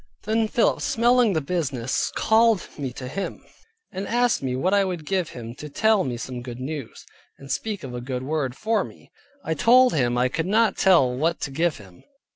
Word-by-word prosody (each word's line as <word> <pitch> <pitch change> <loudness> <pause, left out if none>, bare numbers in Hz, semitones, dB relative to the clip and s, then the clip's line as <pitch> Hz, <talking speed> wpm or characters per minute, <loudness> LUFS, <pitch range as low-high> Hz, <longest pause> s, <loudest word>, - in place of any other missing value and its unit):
Then 220 +1 +1
Philip 230 - +1
smelling 240 -3 +3
the 160 - 0
business 140 -6 -2
called 220 -3 +3
me 135 -4 -4
to 130 0 -7
him, 195 +9 -4 0.5
and 195 +1 -5
asked 245 0 +1
me 130 -2 -2
what 180 +9 0
I 200 -1 +4
would 180 -5 -4
give 185 -1 -1
him, 115 -1 -8
to 150 - -8
tell 215 +7 +2
me 125 -2 -3
some 125 +1 -6
good 120 0 -8
news, 140 -1 -6 0.3
and 140 0 -9
speak 210 -5 -3
a 125 -2 -6
good 125 0 -4
word 135 -3 -2
for 220 +6 0
me. - - -14 0.3
I 160 - 0
told 250 - +5
him 120 -5 +1
I 125 +1 +3
could 165 +6 -3
not 220 +3 +3
tell 150 -10 +4
what 165 +6 0
to 135 - -3
give 165 +3 0
him. 95 -4 -16
160 Hz, 200 wpm, -24 LUFS, 130-215 Hz, 0.5 s, told